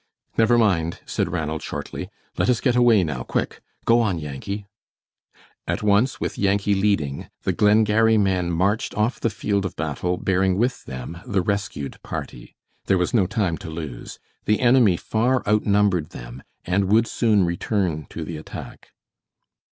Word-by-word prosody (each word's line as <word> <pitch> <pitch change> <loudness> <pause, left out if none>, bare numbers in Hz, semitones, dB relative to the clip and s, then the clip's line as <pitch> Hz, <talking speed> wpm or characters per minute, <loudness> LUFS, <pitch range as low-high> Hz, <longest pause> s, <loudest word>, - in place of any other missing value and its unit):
"Never 115 +1 +4
mind," 85 -7 +1
said 85 - -2
Ranald, 80 -3 -2
shortly, - - -6 0.3
"let - - +1
us 120 -3 +3
get 125 -3 +1
away 120 -5 +5
now, 75 -6 -3
quick! - - -3 0.2
Go 115 +1 +5
on, 105 -7 +1
Yankee." 80 +8 -5 1.0
At - - -2
once, 105 +5 +2
with - - -3
Yankee 100 0 +2
leading, 95 -9 0
the - - +1
Glengarry 110 +1 +4
men 95 -4 +1
marched 95 +6 0
off 110 +4 0
the 115 - +1
field 100 -1 -1
of 95 - -4
battle 80 +4 -2
bearing 95 0 +1
with 125 +4 0
them 65 +6 -7
the 95 -3 +1
rescued 100 -8 -3
party. - - -7 0.3
There 95 - +3
was 90 -1 0
no 100 -6 +3
time 95 -6 -1
to - - -8
lose. 80 -6 -7 0.3
The 105 - +2
enemy 120 -7 +5
far 120 +6 0
outnumbered 100 -5 +2
them, - - -9 0.2
and 95 +2 +1
would 110 +4 +4
soon 110 -5 +2
return 85 - -1
to 80 - -6
the 80 0 -6
attack. 75 - -9
100 Hz, 160 wpm, -23 LUFS, 85-110 Hz, 1.0 s, away